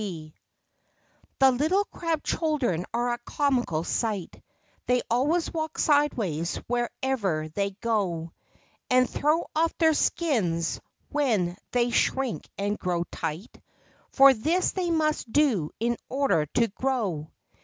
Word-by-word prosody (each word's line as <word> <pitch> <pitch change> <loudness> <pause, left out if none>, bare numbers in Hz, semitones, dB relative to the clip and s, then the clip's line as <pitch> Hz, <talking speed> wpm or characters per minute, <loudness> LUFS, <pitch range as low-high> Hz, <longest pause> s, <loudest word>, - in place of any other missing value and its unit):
C 160 -7 -6 1.1
he 270 - +6
little 315 +11 +1
crab 330 -5 -3
children 270 - 0
are 240 +1 0
a 240 - -4
comical 245 - 0
sight; 205 -1 -2 0.5
They 250 0 +2
always 295 +8 +1
walk 315 -1 -3
sideways 225 - +1
wherever 240 -9 -1
they 200 +3 -3
go, 180 -8 -1 0.6
And 255 0 +4
throw 305 +3 0
off 325 +1 +1
their 320 -2 +4
skins 190 - 0 0.3
when 220 -12 +1
they 245 -1 +1
shrink 260 0 0
and 205 +1 -2
grow 175 -2 -1
tight, 165 +6 -5 0.5
For 275 0 +7
this 320 +10 +1
they 365 -2 -2
must 305 -7 0
do 230 - +2
in 235 +1 0
order 265 - +1
to 235 +9 +1
grow. 200 - -2
240 Hz, 125 wpm, -26 LUFS, 185-290 Hz, 1.1 s, For